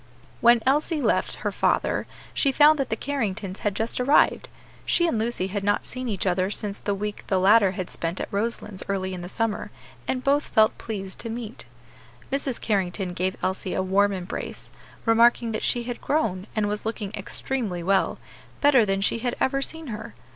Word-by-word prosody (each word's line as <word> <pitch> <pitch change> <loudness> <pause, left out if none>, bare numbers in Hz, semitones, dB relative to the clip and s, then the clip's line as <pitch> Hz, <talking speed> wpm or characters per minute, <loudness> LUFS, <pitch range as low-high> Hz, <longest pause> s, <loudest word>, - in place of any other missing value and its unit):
When 235 -1 +5
Elsie 300 +4 +2
left - - +1
her - - +1
father - - +1 0.3
she 275 - +2
found 300 +2 +6
that 270 - -1
the 220 - 0
Carringtons 215 -8 -3
had 205 -2 -1
just 225 +3 -1
arrived. 280 +4 +3 0.3
She 345 - +2
and 280 -10 +1
Lucy 225 -4 -1
had 200 +1 -3
not 205 +1 +1
seen 255 -1 -4
each 200 -3 -2
other 185 0 +1
since 205 0 -1
the 205 - -1
week 210 +1 -4
the 190 - +2
latter 200 0 +5
had 185 -1 -5
spent 170 +2 -2
at - - -5
Roselands 210 -2 -2
early 190 -1 -1
in 180 - -5
the 175 - -7
summer, 225 +1 -2 0.4
and 255 -1 -1
both 285 +1 +3
felt 220 0 +3
pleased 195 -4 -6
to 230 - -5
meet. 230 - -6 0.7
Mrs. 275 -2 -1
Carrington 190 -3 -1
gave 185 +1 -1
Elsie 185 0 -2
a 190 - 0
warm 200 +2 +3
embrace, 185 -2 -6 0.3
remarking 230 0 +4
that 215 - -2
she 240 - +1
had 245 0 -5
grown, 215 -11 0
and 215 -1 +1
was 210 0 -2
looking 220 -2 -4
extremely 215 -12 -2
well; 195 +2 +2 0.4
better 270 -7 +5
than 195 0 0
she 205 - +1
had 245 +1 -2
ever 275 +1 +1
seen 320 +3 -1
her. 220 +1 -8
215 Hz, 190 wpm, -25 LUFS, 195-245 Hz, 0.7 s, found